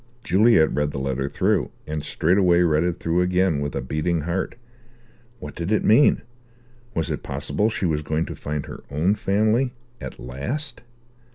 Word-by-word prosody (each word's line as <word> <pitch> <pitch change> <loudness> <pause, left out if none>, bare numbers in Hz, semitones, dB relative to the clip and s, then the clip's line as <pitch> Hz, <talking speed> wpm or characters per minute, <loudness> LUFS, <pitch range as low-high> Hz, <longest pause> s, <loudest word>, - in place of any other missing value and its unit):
Juliet 105 -5 +4
read 75 0 0
the 70 - -6
letter 65 +1 -2
through, - - +1 0.2
and 75 -1 -4
straightway 90 +1 +3
read 80 -2 +3
it 90 0 -1
through 85 +2 +1
again, 90 -3 +2
with 70 0 -3
a 70 - -2
beating 75 +5 -1
heart. 85 +5 -2 0.8
What - - -8
did 85 +4 -4
it 110 - +2
mean? 125 +7 +5 0.7
Was 80 -2 -1
it - - -3
possible 75 +10 0
she 105 - -2
was 75 -3 0
going 80 +2 -1
to - - -7
find 75 -1 -4
her - - -9
own 80 +8 +1
family 110 +5 +1 0.3
at - - -7
last? 120 - -4
85 Hz, 170 wpm, -23 LUFS, 75-100 Hz, 0.8 s, mean